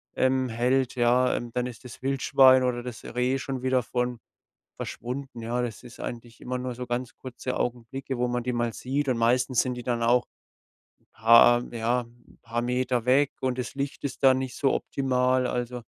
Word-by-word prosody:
ähm, 130 0 +2
hält, 125 +3 +1
ja. 125 +1 +3
Ähm, 120 -1 -4
dann 125 0 -1
ist 120 -1 -10
das 125 -2 -11
Wildschwein 130 -1 +5
oder 120 -1 -1
das 125 -2 -8
Reh 125 +2 0
schon 130 -1 -5
wieder 130 -1 +2
von 125 0 -2 0.6
verschwunden, 125 0 -6
ja. 120 +2 -1
Das 115 -3 -5
ist 125 0 -13
eigentlich 120 0 -7
immer 125 0 -3
nur 125 -1 -4
so 125 +1 -5
ganz 120 0 -3
kurze 130 0 -5
Augenblicke, 125 +2 -3
wo 125 - +1
man 120 0 -2
die 125 0 -2
mal 120 -1 0
sieht 140 +4 -2
und 125 - +1
meistens 125 +2 +2
sind 130 - -2
die 125 - -7
dann 120 -1 -1
auch 120 +1 +3 0.7
'n - - -36
paar 115 +2 +6
ja, 120 +2 0
'n 120 0 -18
paar 120 +1 -3
Meter 125 -1 0
weg 135 +3 +4
und 130 -1 -1
das 125 +1 -4
Licht 140 0 -4
ist 135 - -5
dann 130 -1 +6
nicht 130 -1 -4
so 140 -3 +2
optimal. 130 -1 +1
Also, 125 0 -3
125 Hz, 195 wpm, -26 LUFS, 120-130 Hz, 0.7 s, paar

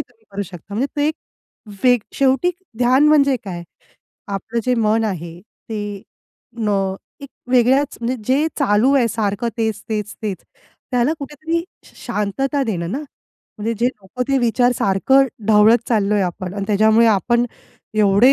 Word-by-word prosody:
तुम्ही 225 -2 -11
करू 200 +1 -3
शकता. 190 +2 -10
म्हणजे 255 +6 0
ते 290 0 +2
एक 310 - -2 0.7
वेग 245 -1 +6 0.2
शेवटी 270 +5 +3 0.3
ध्यान 260 +5 +4
म्हणजे 280 -3 +4
काय? 175 -3 -6 0.7
आपलं 225 +4 -3
जे 250 0 +2
मन 225 0 +2
आहे 170 -4 -4 0.3
ते 205 -2 -4 0.6
अं, 195 -3 0 0.3
एक 280 - -9 0.2
वेगळ्याच, 260 +3 +3
म्हणजे 245 +2 -1
जे 280 +5 +2
चालू 250 0 +3
आहे 255 -4 +4
सारखं 215 +1 -1
तेच-तेच-तेच. 215 -2 -3 0.5
त्याला 250 +4 +2
कुठेतरी 315 +4 -3 0.2
श - - -19
शांतता 255 +6 -1
देणं 175 -6 -2
ना, 270 - -1
म्हणजे 230 -6 -8
जे 245 - +4
लोकं 220 +1 -6
ते 275 - +3
विचार 245 +1 +2
सारखं 265 +8 +3 0.2
ढवळत 220 +2 +6
चाललोय 210 -3 +2
आपण 185 +1 -4
अन् 200 -1 -3
त्याच्यामुळे 220 +2 +4
आपण 235 +3 +2 0.5
एवढे 210 +5 +5
225 Hz, 145 wpm, -19 LUFS, 205-260 Hz, 0.7 s, वेग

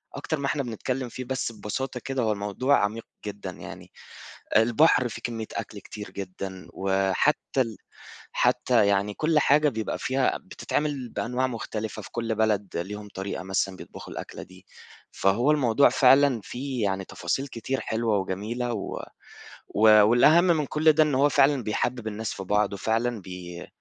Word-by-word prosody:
أكتر 145 +2 -3
ما 140 - -3
إحنا 140 0 0
بنتكلم 125 +2 -3
فيه، 130 - -6
بس 130 -1 -2
ببساطة 125 +4 -4
كده 135 -1 -1
هو 110 - +2
الموضوع 105 +7 +1
عميق 110 +2 -2 0.2
جدًا 100 -2 -5
يعني، - - -10 0.7
البحر 120 +3 +4
فيه - - -8
كمية 115 -2 -4
أكل 105 -2 -5
كتير 105 +1 -9
جدًا 95 -1 -7
وحتى 95 +9 +1
ال 115 -4 -1 0.6
حتى 100 - +3
يعني 100 +1 +1
كل 155 +6 +2
حاجة 150 +1 +4
بيبقى 110 -4 -3
فيها 130 0 +1
بتتعمل 145 -5 -3
بأنواع 125 +3 -1
مختلفة 110 -3 -5
في - - -12
كل 115 -1 -2
بلد 105 -4 0
ليهم 105 +4 -5
طريقة 95 0 -4
مثلًا 95 0 -1
بيطبخوا - - -10
الأكلة - - -7
دي، 95 0 -17 0.5
فهو 115 +9 +2
الموضوع 140 -2 +4
فعلًا 135 -2 +5
فيه 130 -2 -4
يعني 95 -1 -1
تفاصيل 130 +14 -3
كتير 130 +1 -3
حلوة 110 -1 0
وجميلة 105 +6 -3
و 105 - -4 0.7
و - - -5 0.3
والأهم 135 +10 +6
من 165 -4 +2
كل 155 +3 +4
ده 155 +1 +5
إن 150 -3 0
هو 140 +2 +4
فعلًا 140 -1 +3
بيحبّب 110 +2 -2
الناس 110 +1 -3
في 95 - -6
بعض 105 +1 +1
وفعلًا 115 +3 -1
بي 90 -1 -8
115 Hz, 160 wpm, -26 LUFS, 100-135 Hz, 0.7 s, والأهم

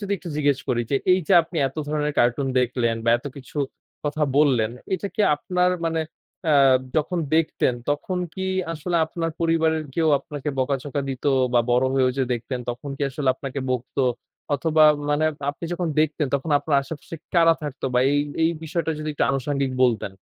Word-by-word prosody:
যদি 200 -1 -3
একটু 175 - -9
জিজ্ঞেস 145 -2 +2
করি। 120 -2 +1
যে, 140 - +3 0.2
এই 185 - +4
যে, - - +2
আপনি 165 +1 -9
এত 135 - -18
ধরনের 150 0 -1
কার্টুন 125 +3 +2
দেখলেন 120 -2 0
বা 115 - +3
এত 135 - -10
কিছু 140 +2 -8 0.5
কথা 150 +1 -1
বললেন। 130 -7 +3 0.2
এটা 200 - -3
কি - - -2 0.2
আপনার 180 +4 +1 0.2
মানে 165 0 0 0.5
আ - - +5 0.4
যখন 170 +4 0 0.2
দেখতেন 155 -5 +1 0.2
তখন 180 +5 -1 0.2
কি 190 -1 -3 0.3
আসলে 170 +2 -2
আপনার 165 0 -3
পরিবারের 160 -1 +2
কেউ 165 -2 +2
আপনাকে 145 +1 -6
বকা 135 +1 +1
ঝকা 145 -1 -3
দিতো? 135 +2 -1 0.2
বা 120 - +6
বড় 125 +2 +3
হয়ে 130 -1 +3
যে, - - +3
দেখতেন 125 +2 -5
তখন 130 +4 -7
কি - - -5
আসলে 135 0 -2
আপনাকে 135 +1 -5
বকতো? 130 +2 -1 0.5
অথবা 155 +2 +3 0.3
মানে 145 +2 +2 0.3
আপনি 145 +4 -9
যখন 175 -1 -2
দেখতেন 155 -1 +1
তখন 140 +3 -2
আপনার 145 0 0
আশেপাশে 145 +3 -8 0.2
কারা 165 -1 +6
থাকতো? 145 -3 -6
বা 125 - +4
এই, 145 - +3 0.2
এই, 160 - +4
বিষয়টা 160 0 -2
যদি 155 - -4
একটু - - +1
আনুষঙ্গিক 135 0 -1
বলতেন? 110 -5 0
145 Hz, 185 wpm, -23 LUFS, 130-160 Hz, 0.5 s, বা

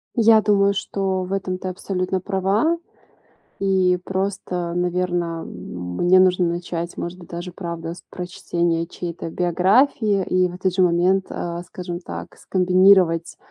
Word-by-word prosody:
Я 225 -1 +6
думаю, 200 -1 +3
что 190 -1 -2
в 185 - -7
этом 190 -2 -2
ты 185 - -5
абсолютно 185 0 -2
права. 200 - +1 0.8
И 185 -2 +2
просто, 185 -3 -2
наверно, 175 -2 -1
мне 90 - 0
нужно 185 -1 +4
начать, 170 0 -4
может 180 +2 -5
быть, 170 - -13
даже, 175 +1 -6
правда, 170 -2 -5
с 180 - -13
прочтения 170 -2 -2
чьей-то 170 -2 -6
биографии, 195 - +2
и 185 0 +2
в 175 - -8
этот 185 0 -1
же 185 - +2
момент, 180 +2 +3
э, 170 0 -4
скажем 175 -1 -6
так, - - -8
скомбинировать 185 -2 +3
180 Hz, 140 wpm, -22 LUFS, 175-190 Hz, 0.8 s, Я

